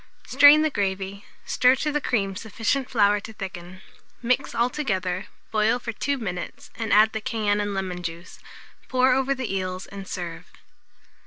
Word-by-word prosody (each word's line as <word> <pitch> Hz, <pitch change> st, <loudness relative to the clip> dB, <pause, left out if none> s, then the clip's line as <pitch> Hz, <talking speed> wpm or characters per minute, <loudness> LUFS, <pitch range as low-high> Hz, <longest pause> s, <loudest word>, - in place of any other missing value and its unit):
Strain 295 Hz, +2 st, +7 dB
the 310 Hz, -, +1 dB
gravy, 195 Hz, -1 st, -3 dB, 0.2 s
stir 250 Hz, +1 st, +4 dB
to 300 Hz, +3 st, -1 dB
the 295 Hz, 0 st, -1 dB
cream 195 Hz, -7 st, 0 dB
sufficient 230 Hz, +5 st, -2 dB
flour 205 Hz, -3 st, +3 dB
to 220 Hz, +2 st, -10 dB
thicken; 185 Hz, -2 st, -8 dB, 0.4 s
mix 245 Hz, 0 st, 0 dB
altogether, 215 Hz, -7 st, -1 dB, 0.2 s
boil 220 Hz, +2 st, +2 dB
for 240 Hz, -1 st, -5 dB
2 280 Hz, +5 st, -2 dB
minutes, 180 Hz, -7 st, -6 dB
and 225 Hz, -1 st, -4 dB
add 215 Hz, +2 st, +5 dB
the 220 Hz, -, -3 dB
cayenne 210 Hz, -2 st, 0 dB
and 205 Hz, -1 st, -3 dB
lemon 185 Hz, -2 st, -3 dB
juice; 170 Hz, +1 st, -7 dB, 0.5 s
pour 255 Hz, 0 st, +4 dB
over 265 Hz, +1 st, +1 dB
the 255 Hz, -6 st, -4 dB
eels 185 Hz, 0 st, -3 dB
and 195 Hz, -1 st, -9 dB
serve. 170 Hz, -2 st, -6 dB
210 Hz, 160 wpm, -24 LUFS, 190-250 Hz, 0.5 s, Strain